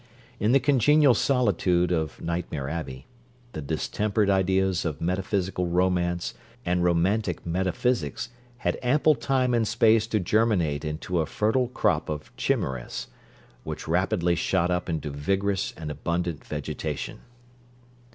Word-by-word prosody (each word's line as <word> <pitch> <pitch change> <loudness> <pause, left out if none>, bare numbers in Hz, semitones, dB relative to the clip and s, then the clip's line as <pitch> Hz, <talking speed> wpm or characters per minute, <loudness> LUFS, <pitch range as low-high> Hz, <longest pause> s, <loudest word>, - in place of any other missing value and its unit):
In 105 - +2
the 135 - +6
congenial 145 +1 +5
solitude 95 -9 +2
of 80 -4 -1
Nightmare 85 -5 -3
Abbey, 70 -4 -5 0.5
the 80 - -6
distempered 100 +7 0
ideas 95 -1 +2
of 80 -4 -3
metaphysical 90 +1 -1
romance 90 0 0 0.3
and 90 0 +1
romantic 90 +3 +1
metaphysics 95 +9 -1 0.3
had 120 - -1
ample 145 +5 +4
time 130 -3 0
and 115 -2 +2
space 110 -1 +4
to 110 -1 0
germinate 90 -7 +1
into 80 +3 -2
a 80 - 0
fertile 115 +4 +1
crop 105 - 0
of 75 -1 -6
chimeras, 65 -2 -2 0.5
which - - -6
rapidly 90 +1 +1
shot 90 +1 +1
up 90 0 -1
into 80 -3 -2
vigorous 95 +7 -1
and 75 -2 -5
abundant 85 +1 -2
vegetation. - - -4
90 Hz, 125 wpm, -26 LUFS, 85-110 Hz, 0.5 s, the